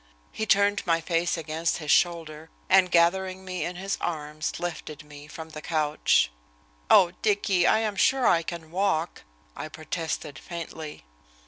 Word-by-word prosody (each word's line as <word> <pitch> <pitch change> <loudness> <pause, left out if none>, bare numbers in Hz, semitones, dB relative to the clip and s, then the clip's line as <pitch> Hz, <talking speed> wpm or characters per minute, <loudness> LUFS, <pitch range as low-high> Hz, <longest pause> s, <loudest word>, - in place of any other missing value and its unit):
He 220 - -4
turned 200 0 +3
my 165 -1 +3
face 170 +1 0
against 160 +1 -2
his 150 -3 -2
shoulder, 160 -2 +1 0.2
and, 185 -1 +5
gathering 185 +2 +2
me 185 -3 -3
in 175 +3 -4
his 195 +2 -3
arms, 155 -2 -3
lifted 160 -3 -5
me 145 -1 -13
from 160 +1 -9
the 155 - -8
couch. 150 - +1 0.6
"Oh, 175 -2 +6
Dicky, 200 -4 +2
I 220 - +4
am 215 -2 -1
sure 265 +6 +3
I 170 - +4
can 165 -1 -7
walk," 180 -3 0 0.3
I - - -6
protested 155 -3 -5
faintly. 160 - -8
170 Hz, 150 wpm, -26 LUFS, 155-185 Hz, 0.6 s, Oh